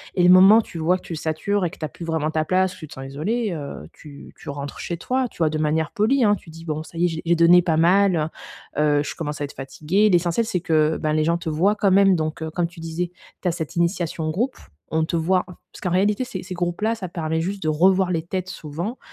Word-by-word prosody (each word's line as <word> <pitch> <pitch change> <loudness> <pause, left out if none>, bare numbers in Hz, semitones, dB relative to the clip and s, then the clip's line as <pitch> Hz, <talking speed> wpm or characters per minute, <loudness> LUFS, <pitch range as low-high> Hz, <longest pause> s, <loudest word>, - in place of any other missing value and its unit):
et 180 - +2
le 175 - +6
moment 190 +4 +8
où - - +3
tu 175 - -10
vois 170 +3 +2
que - - -17
tu 165 - -6
satures 165 +6 -1
et 170 - -2
que - - -14
tu - - -7
as - - -5
plus 165 +5 -9
vraiment 160 -2 -1
ta 155 0 0
place 185 +1 +1
ou - - -16
tu 155 - -8
te - - -12
sens 135 0 -8
isolé, 205 - -2
heu, 145 -4 -7
tu 145 -2 -13
tu - - -10
rentres 140 0 -6
chez 170 - -4
toi, 255 +7 -1
tu - - -20
vois? 160 -2 +3
De 155 - -2
manière 155 0 0
polie, 240 +5 +2
hein, 205 -1 +4
tu 165 - -13
dis: 165 +1 -12
«Bon 155 -1 -3
ça 165 - -13
y 175 - +3
est - - +4
j'ai 160 -1 -4
j'ai 170 +1 +3
donné 170 +2 +6
pas 165 -2 +1
mal, 175 -1 +3 0.5
heu - - +2 0.2
heu, - - 0
je - - -6
commence 150 -2 -5
à - - 0
être 140 - -10
fatigué». 155 +10 0
L'essentiel 175 +6 +2
c'est 180 -6 -2
que, 155 -2 +2
bah, 155 0 -1
les 155 0 +2
gens 170 +2 +1
te 170 -1 -5
voient 185 +7 +2
quand 200 -2 +2
même 195 0 +5
donc 155 -1 -3
heu, 160 - -4
comme 170 +1 0
tu 170 0 -15
disais, 165 +2 -4 0.3
tu 185 - -2
as - - +3
cette 160 -3 -5
initiation 170 -2 -1
de 155 - 0
groupe, 245 +10 -1 0.3
on 160 +1 +1
te 170 - -3
voit. 180 +3 +1
Parce 180 - -15
qu'en 180 - -1
réalité 205 +6 +2
ces 185 -7 -6
ces 185 - -7
groupes-là 175 +6 -1
ça 185 -6 -6
permet 160 -1 -2
juste 195 +3 -3
de 155 - +1
revoir 185 +4 +3
les 165 -2 0
têtes 185 +1 -4
souvent, 175 - -5
170 Hz, 280 wpm, -22 LUFS, 155-190 Hz, 0.5 s, moment